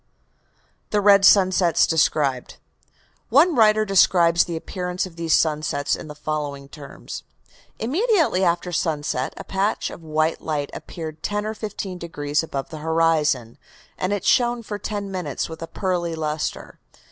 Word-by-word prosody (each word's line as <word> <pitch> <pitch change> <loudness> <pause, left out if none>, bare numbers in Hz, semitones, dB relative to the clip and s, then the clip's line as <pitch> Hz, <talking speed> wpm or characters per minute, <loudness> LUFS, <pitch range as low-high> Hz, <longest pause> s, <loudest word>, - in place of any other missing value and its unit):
THE 210 - +1
RED 200 -1 +6
SUNSETS 185 -4 +5
DESCRIBED 145 -5 +1 0.7
One 305 +8 +5
writer 215 -1 +4
describes 170 -4 +4
the 170 - -5
appearance 180 +2 -3
of 180 -3 -11
these 165 -1 +2
sunsets 150 -2 0
in 155 - -9
the 150 - -9
following 145 -2 -4
terms: 140 -1 -9 0.6
"Immediately 325 - +1
after 175 0 0
sunset 150 -6 -1
a - - -7
patch 195 +2 -1
of - - -10
white 155 0 -1
light 145 -3 -3
appeared 160 -3 -8
ten 210 0 -2
or 215 - -2
fifteen 205 -4 -6
degrees 145 -3 -2
above 140 -4 -5
the 155 - -8
horizon, 155 -7 +1 0.4
and 185 - -2
shone 240 -1 +2
for 205 -1 -5
ten 205 -2 -4
minutes 180 -7 -3
with 160 0 -9
a 165 - -5
pearly 175 -3 -2
lustre. 155 -1 -4
170 Hz, 145 wpm, -22 LUFS, 155-200 Hz, 0.7 s, RED